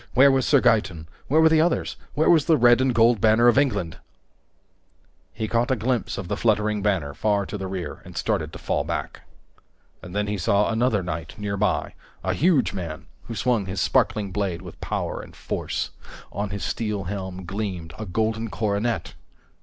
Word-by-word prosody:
Where 140 +2 +7
was 135 -1 +1
Sir 140 -3 +5
Gaeton? 90 -8 +2 0.2
Where 155 +4 +4
were 160 - +6
the 160 -1 +4
others? 170 +1 0 0.2
Where 155 - +2
was 160 -4 +5
the 160 - +4
red 120 0 +5
and 130 0 +2
gold 115 -2 +4
banner 115 +2 +5
of 120 - +6
Richard? 105 - +1 1.3
He 110 - -4
caught 115 +2 +1
a 130 - +3
glimpse 120 +1 -1
of 95 - -5
the 105 - -1
fluttering 105 -1 +1
banner 95 -9 0
far 100 +1 0
to 105 - -6
the 95 -2 -4
rear 95 -2 -5
and - - -11
started - - -1
to - - -8
fall 70 - -1
back. 75 -3 -4 0.8
And 90 +2 -10
then 105 0 +1
he 105 -1 -3
saw 100 +5 +2
another 110 -3 +1
knight 85 -2 -5
nearby, 105 0 -1 0.3
a - - 0
huge 160 -4 +2
man 85 -5 -6 0.2
who 115 - -6
swung 110 -2 0
his 95 +1 -3
sparkling 100 -3 +1
blade 95 -3 -2
with 90 - -11
power - - -3
and - - -13
force. - - -3 0.4
On 100 0 -3
his 100 0 -5
steel 105 -3 -2
helm 95 0 -5
gleamed 90 -5 -4
a 110 - -5
golden 110 +4 -1
coronet! 100 -1 -1
105 Hz, 185 wpm, -24 LUFS, 95-120 Hz, 1.3 s, Where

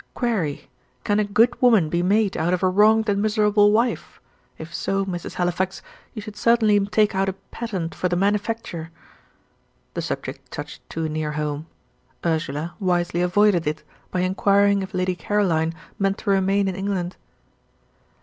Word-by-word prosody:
"Query, 205 - -1 0.4
Can 205 0 +1
a - - +3
'good 230 +5 +2
woman' 225 -10 +5
be 170 +2 0
made 200 +2 +2
out 170 +3 +1
of 180 - -6
a - - +5
'wronged 215 +4 +4
and 200 -1 +1
miserable 210 -1 +3
wife'? 230 +3 0 0.4
If 160 +1 -9
so, 195 0 -1
Mrs. 175 -3 -5
Halifax, 180 +1 -1 0.3
you 215 - -5
should 210 0 -9
certainly 215 -2 +3
take 210 0 +2
out 195 0 +1
a - - -3 0.2
patent 190 -8 -4
for 180 - -1
the 175 - 0
manufacture." 200 -3 -1 1.0
The - - -3
subject - - -5
touched - - -7
too 160 0 -2
near 155 -1 -3
home. 150 +1 -3 0.6
Ursula 160 0 -1
wisely 175 -2 0
avoided 180 -2 +3
it, 150 0 -2 0.3
by 180 - -1
inquiring 200 +2 +3
if 190 -1 -6
Lady 185 0 0
Caroline 170 -3 +1 0.3
meant 195 0 +1
to 200 - -1
remain 195 +1 +2
in 190 - -2
England. 190 -2 -2
195 Hz, 160 wpm, -23 LUFS, 175-210 Hz, 1.0 s, woman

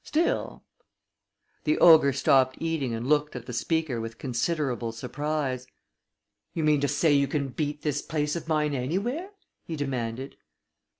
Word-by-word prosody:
Still 325 +3 -1 0.5
" - - -46
The 310 - +2
ogre 160 -5 +7
stopped 130 0 +3
eating 160 -6 -1
and 115 +1 -4
looked 150 +1 +1
at 125 - -6
the 125 - -7
speaker 150 -1 -1
with 115 0 -6
considerable 130 -2 -1
surprise. 130 +2 -3 0.9
"You 165 - -1
mean 150 -2 +3
to 145 - +2
say 145 +2 +2
you 140 -1 +3
can 140 -1 -1
beat 145 +2 -3
this 145 -2 0
place 150 -1 -2
of 170 - -5
mine 150 -2 +1
anywhere?" 200 - -2 0.3
he 165 - -5
demanded. 130 -2 -4
145 Hz, 155 wpm, -27 LUFS, 130-160 Hz, 0.9 s, ogre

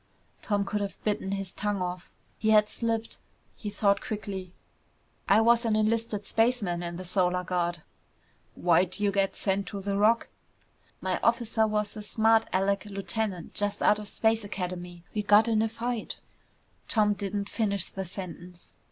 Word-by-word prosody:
Tom 205 -2 0
could 205 +1 -2
have 200 -1 -4
bitten 205 -2 -1
his 195 -2 -4
tongue 205 -1 -1
off. 180 -1 -4 0.3
He 220 - +1
had 210 -1 +6
slipped. 230 0 -2 0.4
He 210 - -5
thought 200 -1 +2
quickly. 195 -4 -5 0.8
"I 205 +3 +6
was 235 +1 +4
an 225 -2 +1
enlisted 215 -1 0
spaceman 225 -7 +1
in 170 0 -4
the 185 +1 -7
Solar 180 0 +1
Guard." 175 -2 -1 0.7
"Why'd 175 +2 +2
you 205 -1 +2
get 195 0 +1
sent 195 0 0
to 200 - -5
the 200 0 -2
Rock?" 215 +3 +3 0.7
"My 185 -1 -1
officer 230 -1 +2
was 210 0 -1
a 215 - -6
smart 220 +1 +3
alec 200 +2 +1
lieutenant 200 -2 -3
just 205 0 -1
out 210 - +4
of 210 - -7
Space 220 +1 +1
Academy. 180 -3 -5
We 210 - 0
got 210 +2 +5
in 220 -2 +2
a 225 - +1
fight 230 0 -4 0.4
" - - -39
Tom 210 -2 +3
didn't 200 0 -3
finish 200 -4 -1
the 195 - -5
sentence. 180 -1 -9
205 Hz, 165 wpm, -28 LUFS, 185-220 Hz, 0.8 s, had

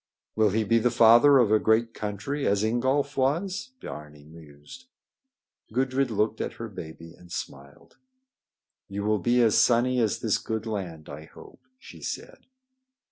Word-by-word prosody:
"Will 110 -1 +3
he 110 +3 0
be 115 +2 +2
the 125 - +2
father 120 +4 +6
of 120 -5 +3
a 110 - +5
great 115 +1 +1
country, 105 +8 -4
as 100 +1 +1
Ingolf 130 +5 0
was?" 180 - -1
Biarni 75 -1 -10
mused. 80 - -15 0.8
Gudrid 130 +2 0
looked 110 0 -1
at - - -4
her 115 - -7
baby 85 -3 -10
and 90 0 -18
smiled. 70 -2 -9 0.9
"You 100 +1 -4
will 105 0 +1
be 120 +2 +2
as 110 -3 +3
sunny 125 +1 +3
as 110 -4 +1
this - - +1
good 110 0 -4
land, 90 -8 -5
I 75 +1 -9
hope," - - -16 0.2
she - - -14
said. - - -7
110 Hz, 155 wpm, -26 LUFS, 95-125 Hz, 0.9 s, father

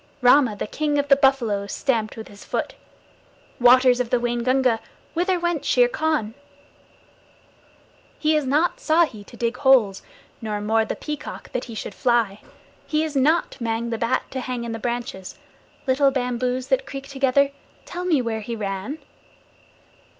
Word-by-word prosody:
Rama, 250 -2 +5
the - - -4
King 295 +6 -1
of 285 0 0
the 275 - +8
Buffaloes, 235 -8 +1
stamped 230 -6 -1
with 220 - -7
his 200 0 -13
foot. - - -3 0.9
Waters 250 0 +6
of 250 -2 -1
the 250 - +2
Waingunga, 240 0 +1 0.3
whither 360 +2 +1
went 345 -3 -1
Shere 245 -1 +4
Khan? 300 -6 -1 1.8
He 310 0 +2
is 300 -3 0
not 300 +6 +1
Ikki 315 -10 +2
to 235 - -15
dig 235 +1 -1
holes, 250 -8 +4 0.4
nor 215 -2 -3
Mao, 220 +2 +1
the - - -3
Peacock, 300 -1 -7
that 250 - -3
he 230 - -9
should 210 - -5
fly. 230 -5 +1 0.5
He 305 0 +1
is 310 -2 -4
not 285 0 +1
Mang 230 0 -2
the 230 - -2
Bat, 230 - +1
to 265 - -3
hang 250 -1 -4
in 235 - -4
the 225 - -4
branches. 235 -5 -4 0.5
Little 275 +1 +3
bamboos 250 0 -2
that 265 0 +1
creak 275 -1 -7
together, 275 0 +2 0.3
tell 360 +1 -5
me 310 -8 +2
where 225 -1 -2
he 230 +2 -5
ran? 200 +6 -4
250 Hz, 160 wpm, -23 LUFS, 225-280 Hz, 1.8 s, the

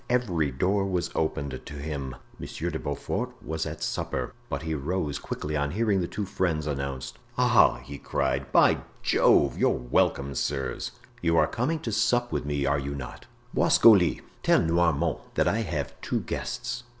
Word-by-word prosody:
Every 95 - +1
door 95 +9 +1
was 90 -2 -1
opened 70 -4 -2
to - - -9
him. 70 -3 -4 0.2
Monsieur - - -4
de - - -3
Beaufort 70 -1 -3
was 80 0 -3
at 75 0 -6
supper, - - -2 0.2
but 70 +1 -3
he 80 -1 -2
rose 75 0 -2
quickly 75 +1 -4
on 70 -1 0
hearing 100 +1 +1
the 85 - -1
two 105 - -3
friends 85 -5 -1
announced. 70 -3 -4 0.2
"Ah!" - - +5
he 70 +2 -8
cried, 65 0 -1
"by - - +5 0.2
Jove! - - +4
you're - - +4
welcome, 65 +2 +1
sirs. 65 -1 -2 0.3
You 85 -1 +2
are 80 - +6
coming 125 - -1
to 115 - -3
sup 120 +3 +2
with - - -2
me, 70 -1 0
are 70 +1 +2
you 70 0 -4
not? 65 -3 -8 0.3
Boisgoli, 100 -7 +5 0.2
tell - - +4
Noirmont 85 -2 +2 0.2
that - - +2
I 110 - +2
have 80 -10 -3
two - - -1
guests. 120 0 -4
75 Hz, 170 wpm, -27 LUFS, 70-95 Hz, 0.3 s, are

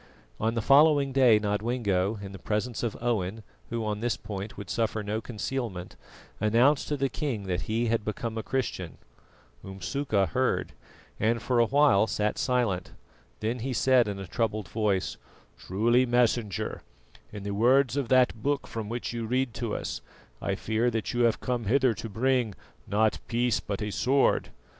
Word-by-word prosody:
On 115 +1 0
the 115 - -1
following 145 0 +5
day 130 -5 +6
Nodwengo, 105 -1 0
in 100 - -7
the 95 - -9
presence 110 +2 -2
of 120 -3 -2
Owen, 110 -3 -1 0.3
who 115 -2 -2
on 105 -1 -2
this 120 +1 -1
point 105 -1 -7
would 100 -3 -7
suffer 110 -2 -1
no 105 +2 -2
concealment, 110 -5 -4 0.4
announced 120 +7 +3
to 145 - -1
the 135 0 +1
king 135 -7 -3
that 90 0 -3
he 115 +2 +1
had 115 -1 0
become 110 +2 -4
a 110 - -2
Christian. 110 -9 -3 0.7
Umsuka 100 +2 -1
heard, 130 0 0 0.5
and 115 +2 +2
for 125 0 0
a 115 - +4
while 140 -7 +4
sat 105 -1 -1
silent. 115 -8 0 0.5
Then 115 +3 -1
he 130 +3 -3
said 125 -2 +4
in 100 -1 -3
a 95 - -6
troubled 110 +1 -2
voice: 100 -2 0 0.4
"Truly, 120 +7 +2
Messenger, 120 -5 0 0.5
in 100 - -7
the 100 0 -3
words 125 +5 +3
of 140 -4 -1
that 125 -3 +3
Book 140 +3 0
from 110 -2 -5
which 120 +1 -4
you 115 -1 -3
read 125 0 0
to 115 -3 -3
us, - - -4 0.4
I 95 - -1
fear 110 +4 0
that 115 -1 -3
you 120 0 +3
have 115 - +2
come 120 -2 -2
hither 130 +2 +3
to 115 - -7
bring, 120 -1 +1 0.3
'not 105 +2 +2
peace 120 0 +1
but 100 0 -4
a 105 - -3
sword. 135 +6 +2
115 Hz, 170 wpm, -28 LUFS, 105-125 Hz, 0.7 s, day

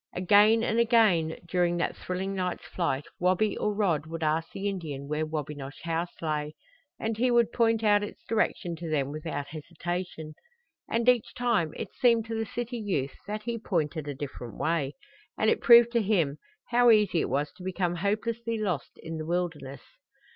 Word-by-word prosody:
Again 210 +5 +5
and 230 0 +1
again 215 -9 +3
during 175 0 +1
that 170 - -1
thrilling 190 +2 -3
night's 180 -2 -3
flight 150 -6 -2
Wabi 185 +4 +2
or 210 - 0
Rod 175 -8 0
would 165 0 -5
ask 160 +1 0
the 195 +1 -3
Indian 155 -8 -4
where 150 +1 -1
Wabinosh 145 -2 -6
House 170 +1 -1
lay, 150 -1 -2 0.4
and 220 -1 -2
he 250 +1 +3
would 235 -1 +3
point 225 -1 +2
out 205 -1 +4
its 205 - -7
direction 190 -5 0
to 170 0 -6
them 140 -3 0
without 150 -2 -5
hesitation. 165 +1 -5 0.6
And 230 +1 0
each 250 -3 +3
time 205 -11 +1
it - - -6
seemed 235 -4 +3
to 225 0 -4
the 225 0 -2
city 240 +3 -4
youth 175 -11 -2
that 210 +1 -4
he 235 0 -3
pointed 155 -7 -2
a 145 - -4
different 130 -5 -7
way, 155 -4 -1 0.4
and 215 - +3
it - - 0
proved 235 0 +8
to 235 -1 +2
him 170 -9 +1 0.3
how 245 0 +5
easy 210 -7 +4
it - - -2
was 145 +3 0
to 180 - -11
become 180 -1 -1
hopelessly 225 +4 -1
lost 190 -8 -3
in 165 0 -5
the 155 - -5
wilderness. 165 -6 -3
180 Hz, 180 wpm, -28 LUFS, 155-220 Hz, 0.6 s, proved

